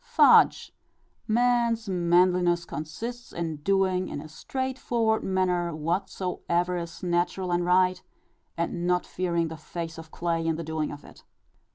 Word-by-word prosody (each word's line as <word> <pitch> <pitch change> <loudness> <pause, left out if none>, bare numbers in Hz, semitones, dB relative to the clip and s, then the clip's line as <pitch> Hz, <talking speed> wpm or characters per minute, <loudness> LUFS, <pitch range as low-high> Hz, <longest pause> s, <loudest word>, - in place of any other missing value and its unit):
Fudge! - - +5 0.5
Man's 235 -1 +2
manliness 175 -1 +3
consists 230 +13 -6
in 165 -2 -3
doing, 185 +2 +1
in - - -5
a 155 - -8
straightforward 235 +4 -1
manner, 180 -3 0
whatsoever 175 +1 -1
is 170 0 -6
natural 175 +1 0
and 175 0 +1
right, 185 +1 +3 0.6
and 170 +1 -2
not 180 0 +1
fearing 170 -2 -1
the 160 - -7
face 165 +1 -6
of 165 -1 -10
clay 165 0 -1
in 165 - +1
the 165 - -5
doing 160 -1 -2
of 145 - -9
it. - - -16
175 Hz, 140 wpm, -27 LUFS, 170-190 Hz, 0.6 s, Fudge